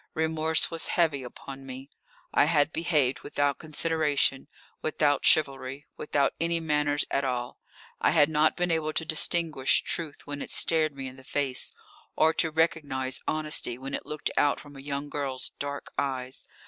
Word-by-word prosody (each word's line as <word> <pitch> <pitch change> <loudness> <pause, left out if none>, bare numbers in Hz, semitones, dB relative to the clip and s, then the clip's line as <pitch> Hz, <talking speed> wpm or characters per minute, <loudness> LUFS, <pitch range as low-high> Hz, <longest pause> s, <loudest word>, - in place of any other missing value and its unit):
Remorse 160 0 +2
was 165 -2 -1
heavy 160 -5 +2
upon 135 +2 -9
me. 135 0 -9 0.5
I - - +5
had 150 -1 +2
behaved 150 -6 +1
without 145 -1 -1
consideration, 155 -3 +1 0.3
without 150 -2 +1
chivalry, 135 -2 +2
without 145 -2 0
any 170 0 +1
manners 150 -2 +1
at 140 - +1
all. 125 -2 -3 0.4
I - - +3
had 145 - +5
not 155 0 +2
been 175 -1 0
able 155 -1 0
to 160 - -1
distinguish 155 -3 +2
truth 160 -4 -2
when 145 0 -6
it - - -5
stared 155 -2 +4
me 135 -1 -6
in 130 0 -8
the 130 - -14
face, 135 -1 -2 0.4
or 160 +1 +4
to 160 - +1
recognise 145 -5 0
honesty 155 -6 +1
when 135 +2 -7
it - - -4
looked 150 0 -2
out 145 - +3
from 145 -1 -13
a - - -10
young 140 +1 -4
girl's 140 -3 -3
dark 140 0 -5
eyes. 130 -2 -3
145 Hz, 165 wpm, -27 LUFS, 135-160 Hz, 0.5 s, I